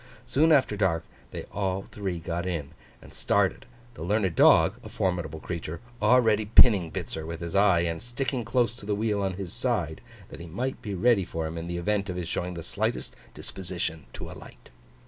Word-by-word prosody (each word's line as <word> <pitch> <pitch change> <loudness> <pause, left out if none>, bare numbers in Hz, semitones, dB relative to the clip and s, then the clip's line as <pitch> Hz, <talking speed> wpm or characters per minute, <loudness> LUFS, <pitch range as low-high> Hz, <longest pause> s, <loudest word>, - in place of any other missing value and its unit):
Soon 160 +4 +3
after 135 -8 +4
dark 95 -5 +1 0.3
they - - -6
all 95 -1 -1
three 95 -4 -4
got 85 +2 -3
in 80 -5 -3 0.3
and - - -14
started; - - +1 0.3
the - - -11
learned 95 +1 +1
dog - - +6
(a - - -8
formidable 85 -4 -2
creature) 85 -1 -5 0.2
already 110 -4 +4
pinning 105 -6 +6
Bitzer 80 - -4
with 80 +1 -6
his 85 -1 -5
eye, 100 -4 +5
and 85 -1 -2
sticking 125 +1 -2
close 120 0 +1
to 105 - -10
the 105 - +1
wheel 105 -1 0
on 95 -1 0
his 90 -2 -6
side, 110 - -1 0.3
that - - -10
he 85 - -8
might 125 +11 -3
be 100 -2 -4
ready 115 +1 +4
for 80 -2 -4
him 80 +1 -4
in 85 0 -5
the 85 0 -3
event 100 +3 0
of 90 - -3
his 90 -2 -4
showing 90 +1 -3
the 85 - -6
slightest 110 +7 -2 0.2
disposition 85 -4 -4
to - - -7
alight. - - -13
95 Hz, 195 wpm, -27 LUFS, 85-110 Hz, 0.3 s, dog